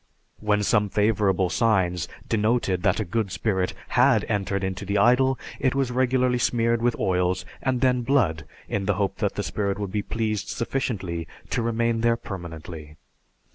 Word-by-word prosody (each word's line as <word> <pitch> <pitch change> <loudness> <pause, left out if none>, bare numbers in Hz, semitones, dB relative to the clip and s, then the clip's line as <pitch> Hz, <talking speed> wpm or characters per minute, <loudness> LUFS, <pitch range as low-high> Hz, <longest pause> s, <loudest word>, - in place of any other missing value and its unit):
When 105 -1 +1
some 105 0 +2
favorable 100 -3 +2
signs 95 -7 +1 0.2
denoted 110 -4 +1
that - - +2
a 110 - -1
good 105 +1 -1
spirit 95 -1 -1
had - - +4
entered 100 -1 -1
into 95 +1 -3
the 100 +1 -1
idol, 125 +5 +4 0.2
it 130 -1 +1
was 135 -2 0
regularly 125 0 +2
smeared 115 -1 +1
with 120 0 +1
oils 90 0 0 0.2
and 130 -2 0
then 125 -1 +3
blood, 115 - +1 0.2
in 100 -1 -2
the 100 -1 +1
hope 100 +1 -1
that - - -1
the - - -2
spirit 100 -2 -2
would 100 -2 -4
be 105 - 0
pleased 110 0 -2
sufficiently 95 -10 -3 0.2
to - - 0
remain 115 0 0
there 115 0 +3
permanently. 80 -6 -8
105 Hz, 165 wpm, -25 LUFS, 95-120 Hz, 0.2 s, had